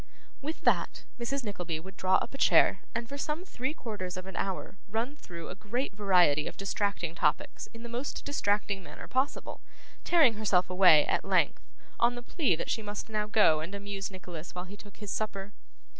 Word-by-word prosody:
With 310 Hz, +3 st, -4 dB
that, -, -, +1 dB
Mrs. 270 Hz, +3 st, -1 dB
Nickleby 180 Hz, -7 st, -3 dB
would 190 Hz, +4 st, -11 dB
draw 185 Hz, 0 st, +3 dB
up -, -, 0 dB
a -, -, -6 dB
chair, 195 Hz, -, +5 dB
and 235 Hz, 0 st, -2 dB
for 280 Hz, +3 st, -6 dB
some 310 Hz, +5 st, -2 dB
three 260 Hz, -6 st, -3 dB
quarters 185 Hz, -, -5 dB
of 185 Hz, -, -6 dB
an 190 Hz, -2 st, -8 dB
hour 195 Hz, 0 st, -3 dB
run 230 Hz, +7 st, -2 dB
through 170 Hz, -, -9 dB
a -, -, -4 dB
great 215 Hz, +5 st, -3 dB
variety 180 Hz, -7 st, +4 dB
of -, -, -7 dB
distracting 195 Hz, -4 st, -1 dB
topics 150 Hz, -3 st, 0 dB
in 230 Hz, 0 st, -11 dB
the -, -, -5 dB
most 240 Hz, +4 st, -4 dB
distracting 205 Hz, -7 st, 0 dB
manner 175 Hz, -, -10 dB
possible; 260 Hz, +3 st, -1 dB, 0.4 s
tearing 315 Hz, -9 st, +5 dB
herself 200 Hz, -4 st, +2 dB
away, 180 Hz, -5 st, +7 dB
at -, -, 0 dB
length, -, -, +2 dB, 0.4 s
on 240 Hz, +1 st, +4 dB
the 245 Hz, -, -7 dB
plea 255 Hz, -, +1 dB
that 160 Hz, -, -3 dB
she 225 Hz, -, 0 dB
must 205 Hz, +1 st, -5 dB
now 210 Hz, -1 st, -1 dB
go 205 Hz, -7 st, +5 dB
and 170 Hz, +6 st, -5 dB
amuse 200 Hz, -1 st, -4 dB
Nicholas 180 Hz, -3 st, -9 dB
while 180 Hz, 0 st, -4 dB
he 195 Hz, +2 st, -10 dB
took 205 Hz, -1 st, -14 dB
his 210 Hz, -1 st, -6 dB
supper. 205 Hz, -2 st, -3 dB
205 Hz, 195 wpm, -30 LUFS, 185-235 Hz, 0.4 s, away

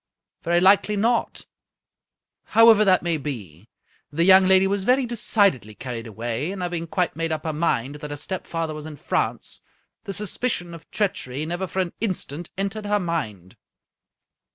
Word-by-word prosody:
" -, -, -63 dB
Very 175 Hz, +1 st, +2 dB
likely 200 Hz, +3 st, +4 dB
not. 230 Hz, +4 st, 0 dB, 1.1 s
However 225 Hz, -2 st, +8 dB
that 185 Hz, -3 st, +3 dB
may 170 Hz, -2 st, +1 dB
be, 110 Hz, -, -7 dB, 0.4 s
the 165 Hz, +3 st, +1 dB
young 190 Hz, +1 st, +7 dB
lady 190 Hz, 0 st, +5 dB
was 195 Hz, 0 st, 0 dB
very 255 Hz, +4 st, +3 dB
decidedly 200 Hz, -, +1 dB
carried 120 Hz, -2 st, -6 dB
away, 115 Hz, -, -3 dB
and 190 Hz, -2 st, -5 dB
having 175 Hz, -1 st, -3 dB
quite 180 Hz, +1 st, -1 dB
made 165 Hz, 0 st, -2 dB
up 155 Hz, -1 st, -2 dB
her 160 Hz, -, -2 dB
mind 145 Hz, -4 st, 0 dB
that 150 Hz, 0 st, -8 dB
her 145 Hz, -, -5 dB
stepfather 165 Hz, -1 st, -4 dB
was 155 Hz, 0 st, -7 dB
in 155 Hz, -, -8 dB
France, 145 Hz, -, -2 dB, 0.4 s
the 200 Hz, -, -4 dB
suspicion 200 Hz, -3 st, -3 dB
of 165 Hz, -2 st, -12 dB
treachery 170 Hz, -9 st, -2 dB
never 175 Hz, +3 st, -3 dB
for 190 Hz, -, -1 dB
an 175 Hz, -, -8 dB
instant 175 Hz, -6 st, -3 dB
entered 200 Hz, +2 st, -3 dB
her 205 Hz, 0 st, +2 dB
mind. 110 Hz, -, -4 dB
175 Hz, 165 wpm, -23 LUFS, 145-195 Hz, 1.1 s, However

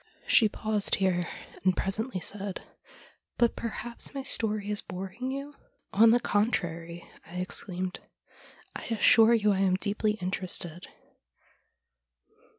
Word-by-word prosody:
She 235 Hz, -, +5 dB
paused 215 Hz, -1 st, +1 dB
here, 180 Hz, -3 st, +1 dB, 0.4 s
and 185 Hz, -1 st, +2 dB
presently 195 Hz, +1 st, -2 dB
said: 200 Hz, 0 st, -1 dB, 0.4 s
' -, -, -29 dB
But 235 Hz, -1 st, +3 dB
perhaps 235 Hz, +3 st, -4 dB
my 275 Hz, -, -3 dB
story 215 Hz, -5 st, 0 dB
is 205 Hz, -, -1 dB
boring 190 Hz, +7 st, -6 dB
you? 275 Hz, +2 st, -5 dB
' -, -, -41 dB
' -, -, -45 dB
On 230 Hz, -, +9 dB
the 240 Hz, +2 st, +5 dB
contrary,' 175 Hz, -7 st, -1 dB, 0.2 s
I 170 Hz, -, -11 dB
exclaimed, 185 Hz, 0 st, -3 dB, 0.4 s
' -, -, -24 dB
I -, -, -6 dB
assure 225 Hz, 0 st, +5 dB
you 210 Hz, -2 st, +3 dB
I 195 Hz, -, +1 dB
am 190 Hz, -1 st, +3 dB
deeply 210 Hz, +2 st, 0 dB
interested.' 180 Hz, -3 st, -3 dB
205 Hz, 140 wpm, -28 LUFS, 185-225 Hz, 0.4 s, On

